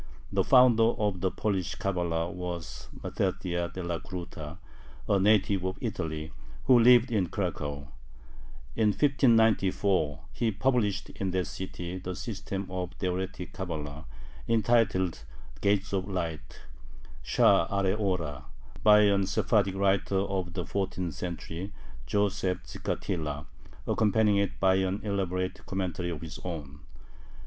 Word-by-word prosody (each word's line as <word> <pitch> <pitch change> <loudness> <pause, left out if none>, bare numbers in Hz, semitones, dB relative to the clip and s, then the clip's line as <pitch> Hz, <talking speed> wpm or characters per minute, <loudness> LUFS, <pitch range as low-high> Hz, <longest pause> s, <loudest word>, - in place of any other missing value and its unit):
The - - +2
founder 120 -3 +5
of 100 -4 -1
the 95 - +2
Polish 95 -6 -2
Cabala 85 -4 -1
was 90 -2 -6 0.2
Mattathiah 85 -1 -1
Delacruta, 85 -2 -5 0.5
a 100 - +3
native 100 -1 +3
of 95 0 -2
Italy, 80 -9 -4 0.3
who 125 -2 +6
lived 120 +1 +6
in 100 -6 +1
Cracow. 75 -7 -3 0.9
In 110 - +3
1594 105 - +3
he 115 - 0
published 110 -1 0
in 95 - -3
that 90 0 0
city 90 -1 -6
the 90 0 -5
system 100 -3 -4
of 90 -1 -3
Theoretic 90 0 -3
Cabala, 80 -5 -5 0.4
entitled 110 - +2 0.4
"Gates 100 0 +1
of 95 0 -1
Light" 85 -5 -4 0.6
(Sha`are 100 +1 +3
Ora), 90 -8 -2 0.4
by 105 0 +7
a 100 -1 +4
Sephardic 100 0 +1
writer 95 0 +2
of 95 -2 -1
the 90 -1 -3
fourteenth 95 -4 -2
century, 90 +3 -5 0.3
Joseph 95 0 0
Gicatilla, 75 +1 -3 0.4
accompanying 105 -1 +3
it 100 -1 -1
by 95 0 +4
an 95 +1 0
elaborate 95 -3 -2
commentary 90 -2 -2
of 80 -3 -5
his 80 -2 -7
own. 75 -6 -6
95 Hz, 120 wpm, -29 LUFS, 85-100 Hz, 0.9 s, by